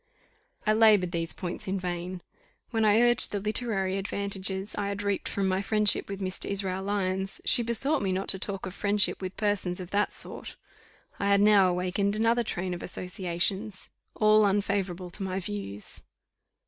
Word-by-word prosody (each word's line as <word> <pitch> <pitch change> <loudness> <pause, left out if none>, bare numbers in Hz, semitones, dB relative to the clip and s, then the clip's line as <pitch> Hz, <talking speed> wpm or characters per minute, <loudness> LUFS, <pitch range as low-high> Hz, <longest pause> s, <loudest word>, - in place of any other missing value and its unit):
I 215 - +3
laboured 215 -5 +4
these 165 -1 -1
points 180 0 -5
in 190 +1 -2
vain. 180 0 -5 0.5
When 225 -2 0
I 215 +2 +4
urged 240 -1 +8
the 205 - -2
literary 195 -2 -1
advantages 195 0 -3
I 205 -1 -3
had 200 0 -4
reaped 200 -1 -2
from 195 -1 -1
my 190 0 0
friendship 210 0 +3
with 195 -1 -5
Mr. 185 -1 -2
Israel 190 -1 -2
Lyons, 195 -1 -2
she - - +4
besought 250 +6 0
me 195 - -1
not 190 +1 -2
to 190 - +4
talk 195 0 -4
of 185 - -6
friendship 205 0 +1
with 185 0 -6
persons 200 -4 -1
of 180 -1 -8
that 205 +1 +1
sort. - - -5 0.6
I 200 - -1
had 200 0 +4
now 205 -2 +5
awakened 185 +3 -1
another 230 +2 +2
train 180 -4 -3
of 175 - -6
associations, 185 +3 -3 0.2
all 215 0 +4
unfavourable 195 -3 -1
to 195 - -4
my 190 0 -2
views. 100 - -5
195 Hz, 175 wpm, -27 LUFS, 185-210 Hz, 0.6 s, urged